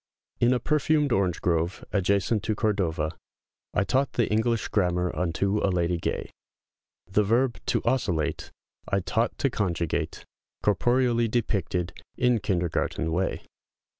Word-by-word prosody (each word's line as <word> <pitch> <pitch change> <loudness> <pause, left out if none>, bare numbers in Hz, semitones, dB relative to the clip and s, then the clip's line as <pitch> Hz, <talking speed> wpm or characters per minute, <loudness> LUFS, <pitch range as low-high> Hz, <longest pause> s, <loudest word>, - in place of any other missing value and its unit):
] - - -48
IN 120 +1 +5
a 125 - +2
perfumed 150 -1 +2
orange 95 -5 +1
grove, 85 +1 0
ajacent 100 +2 +2
to 110 +1 -1
Cordova, 90 -8 0 0.6
I - - +3
taught 135 +6 +1
the 120 - +2
English 110 +1 +1
Grammar 90 -3 +1
unto 95 +4 0
a 100 - +1
lady 85 -1 0
gay; - - -3 0.7
The 105 +2 +2
verb 120 +4 +1
"to - - +1
osculate" 100 - 0 0.4
I 100 - +1
taught 115 +5 0
to 135 - +1
conjugate, 85 -7 -2 0.4
Corporeally 120 +3 +2
depicted, 100 -6 -1 0.2
in 125 -2 +3
kindergarten 85 -3 -1
way. 90 +4 -1
100 Hz, 135 wpm, -26 LUFS, 90-120 Hz, 0.7 s, IN